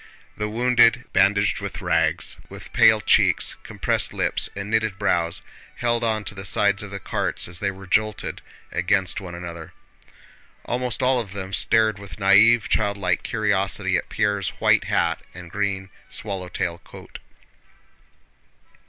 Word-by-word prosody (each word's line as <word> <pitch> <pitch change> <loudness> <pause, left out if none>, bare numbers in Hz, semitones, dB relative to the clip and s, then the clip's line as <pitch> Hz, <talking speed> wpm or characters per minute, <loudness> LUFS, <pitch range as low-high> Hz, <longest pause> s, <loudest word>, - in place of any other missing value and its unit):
The 105 0 -3
wounded, 120 +2 +3
bandaged 100 +1 +3
with - - -5
rags, - - 0
with - - -11
pale - - +6
cheeks, - - +2
compressed - - -2
lips, - - 0
and 100 0 -5
knitted 110 -3 0
brows, 85 -5 0 0.3
held 120 -1 0
on 110 -2 +1
to 100 - -5
the 95 -1 -8
sides 100 +1 +2
of 105 - -7
the 100 0 -6
carts - - -2
as 85 -1 -4
they 100 - 0
were 95 0 -9
jolted 110 +3 -1 0.3
against 95 +2 0
one 90 -2 -8
another. 85 -2 -8 0.9
Almost 125 +1 -1
all 130 0 +3
of 105 -5 -6
them 95 -1 -6
stared 110 +1 +3
with 100 -1 -10
naïve, 105 +3 +5
childlike 100 -3 0
curiosity 100 -3 0
at 85 - -2
Pierre's 100 -3 0
white - - +3
hat - - 0
and 90 -2 -10
green 95 -1 -2 0.2
swallow 95 -4 -5
tail 85 -3 -3
coat. - - -12
100 Hz, 145 wpm, -23 LUFS, 95-110 Hz, 0.9 s, pale